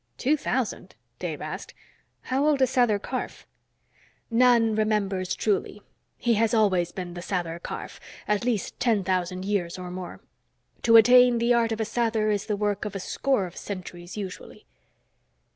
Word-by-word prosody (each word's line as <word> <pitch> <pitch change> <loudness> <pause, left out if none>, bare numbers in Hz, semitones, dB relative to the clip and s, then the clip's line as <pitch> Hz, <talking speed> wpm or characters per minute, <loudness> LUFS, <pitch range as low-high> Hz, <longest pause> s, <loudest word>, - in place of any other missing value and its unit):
"Two 290 +5 +2
thousand?" 260 -5 -3 0.2
Dave - - -4
asked. - - -7 0.5
"How 265 +2 0
old 300 -2 +3
is 260 - +2
Sather 240 -6 +3
Karf?" 255 +5 -5 0.9
"None 230 -1 +4
remembers 205 -4 0
truly. 205 -1 -1 0.3
He 240 - +1
has 225 +1 +2
always 185 -6 +2
been 180 -2 -6
the 175 - -7
Sather 175 -3 -3
Karf - - -7 0.3
at 210 0 +1
least 230 -6 -2
ten 225 -5 +2
thousand 185 0 -1
years 190 -4 -1
or 180 -1 -7
more. 180 -1 -7 0.6
To 230 -1 +4
attain 245 +1 +7
the 235 +1 +3
art 230 -1 +2
of 225 - -2
a 220 - 0
Sather 225 -1 0
is 205 +1 -3
the 210 -2 -1
work 205 -1 -1
of 210 -2 -5
a - - -2
score 260 +2 0
of 175 - -10
centuries, 180 -2 -7
usually." 190 -3 -8
210 Hz, 160 wpm, -26 LUFS, 185-235 Hz, 0.9 s, attain